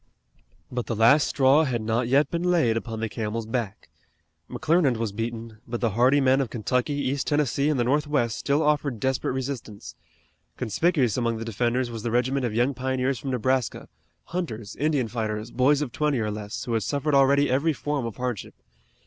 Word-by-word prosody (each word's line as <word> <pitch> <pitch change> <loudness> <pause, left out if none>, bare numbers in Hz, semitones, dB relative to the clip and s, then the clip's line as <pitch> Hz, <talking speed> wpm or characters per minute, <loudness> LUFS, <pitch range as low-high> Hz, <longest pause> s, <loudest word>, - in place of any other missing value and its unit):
But 125 -1 -3
the 115 - -2
last 120 +7 +5
straw 140 +3 +4
had 125 -5 -1
not 115 +2 -1
yet 140 +3 +3
been 170 - -1
laid 170 -11 +2
upon 115 -1 -4
the 115 - 0
camel's 110 +1 -4
back. 110 -2 -4 0.6
McClernand 160 -6 +2
was 115 -2 -2
beaten, 115 0 -5
but 120 0 -3
the 115 -3 0
hardy 125 +7 +4
men 135 0 +3
of 130 - -2
Kentucky, 125 +5 -1
East 140 -1 -2
Tennessee 145 -1 +1
and 150 -4 0
the - - +3
northwest 140 -3 0
still 145 +2 +1
offered 145 -5 0
desperate 130 0 -1
resistance. 130 -6 -5 0.6
Conspicuous 130 - +1
among 115 -2 0
the 115 - -5
defenders 120 +3 -1
was 115 -1 -6
the 115 - -2
regiment 125 +2 +1
of 110 - -5
young 120 +4 +2
pioneers 130 0 -1
from 135 - -5
Nebraska, 130 0 -1 0.4
hunters, 115 - -5
Indian 145 -4 +1
fighters, 110 0 -3
boys 140 +3 +3
of 130 - -6
twenty 150 0 0
or 105 -1 -1
less, 105 0 -5
who 120 - -3
had 115 - +1
suffered 145 +4 -1
already 140 +1 +4
every 140 +6 +2
form 145 -4 -2
of 115 - -7
hardship. 125 -4 -4
125 Hz, 185 wpm, -25 LUFS, 115-140 Hz, 0.6 s, last